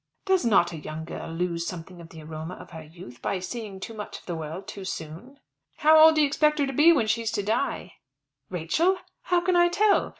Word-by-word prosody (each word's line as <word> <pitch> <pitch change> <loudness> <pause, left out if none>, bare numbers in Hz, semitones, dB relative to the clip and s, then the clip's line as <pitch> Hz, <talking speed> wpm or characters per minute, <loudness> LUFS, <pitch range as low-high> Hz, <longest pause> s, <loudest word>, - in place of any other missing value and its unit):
"Does 380 -2 +2
not 195 -7 +3
a 165 - -6
young 155 +1 -7
girl 165 - -7
lose 170 0 -2
something 175 0 -8
of 165 - -12
the 160 -1 -11
aroma 160 +3 -7
of - - -13
her 160 -2 -8
youth 155 -5 -13
by 195 - -1
seeing 195 +1 -6
too 225 - -7
much 210 -1 -7
of - - -17
the 175 - -4
world 160 +5 -6
too 200 - -7
soon?" 190 - -7 0.4
"How 310 +1 +5
old 320 0 +8
do 310 - +4
you 295 - +4
expect 300 +1 +2
her 285 - +2
to 270 - -4
be 300 +6 +6
when 280 -9 +3
she's 220 +1 0
to 205 -3 -1
die?" 200 -4 -2 0.5
"Rachel! 250 - +1 0.3
How 355 -1 +2
can 360 0 +1
I 345 0 +6
tell? 400 +4 +2
195 Hz, 230 wpm, -26 LUFS, -, 0.5 s, old